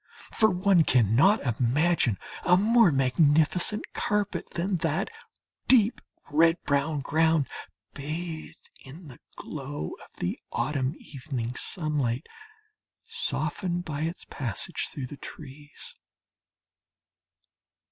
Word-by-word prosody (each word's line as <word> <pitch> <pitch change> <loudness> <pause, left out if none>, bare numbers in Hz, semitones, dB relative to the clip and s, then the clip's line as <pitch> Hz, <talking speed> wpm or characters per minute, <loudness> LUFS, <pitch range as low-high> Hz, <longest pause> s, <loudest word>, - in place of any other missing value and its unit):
For 220 - +4
one 185 -2 +4
cannot 130 - +4 0.2
imagine 130 - +2 0.3
a 180 0 +5
more 220 -1 +5
magnificent 150 +8 +3
carpet 205 -1 -1
than 185 +2 0
that 165 +4 -1 0.6
deep 235 -3 +4 0.3
red 165 +3 +4
brown 140 +1 0
ground, 160 0 +2 0.5
bathed 155 +3 -6
in 150 +4 -12
the 125 - -13 0.2
glow 140 - -6
of - - -19
the - - -3
autumn 140 0 -1
evening 130 -4 -5
sunlight, 145 -5 -1 0.8
softened 195 - -2
by 150 -2 -4
its 165 +3 -4
passage 120 -8 -2
through 135 - -5
the 140 +3 -9
trees. 145 0 -8
155 Hz, 100 wpm, -27 LUFS, 135-180 Hz, 0.8 s, a